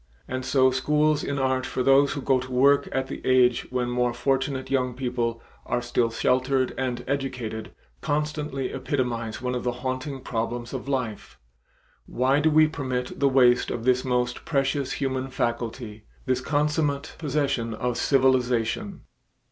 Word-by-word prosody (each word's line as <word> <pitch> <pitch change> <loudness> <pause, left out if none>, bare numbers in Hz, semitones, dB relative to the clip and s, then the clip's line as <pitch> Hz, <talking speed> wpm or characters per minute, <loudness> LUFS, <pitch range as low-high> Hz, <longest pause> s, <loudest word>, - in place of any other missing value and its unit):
And 130 0 -3
so 130 0 +3
schools 150 +3 +2
in 140 - -2
art 130 -1 +1
for 130 -1 -2
those 135 +2 +5
who 140 - -5
go 130 -1 +3
to 130 +1 -7
work 140 +3 +4
at 135 0 -1
the 135 - -8
age 125 -2 +3
when 125 -1 -1
more 125 -1 0
fortunate 135 0 -1
young 125 -2 0
people 120 -2 -2 0.2
are - - -1
still 120 -1 +1
sheltered 130 +2 +1
and 125 -2 -2
educated, 125 -5 -3 0.3
constantly 150 -2 -2
epitomize 120 -5 -2
one 125 0 -1
of 125 - -3
the 125 - 0
haunting 130 +1 -3
problems 120 0 -3
of 130 +1 -5
life; 120 - -3 0.7
why 130 +3 +2
do 155 +2 +3
we 155 0 +6
permit 130 -5 -4
the 140 - +4
waste 125 -2 +4
of 115 - -4
this 125 0 +2
most 125 -1 -1
precious 140 -2 0
human 130 -1 -2
faculty, 115 -3 -3 0.2
this 130 -1 0
consummate 145 +1 0
possession 135 -7 -1
of 125 +2 -2
civilization? 130 - +1
130 Hz, 155 wpm, -25 LUFS, 125-140 Hz, 0.7 s, we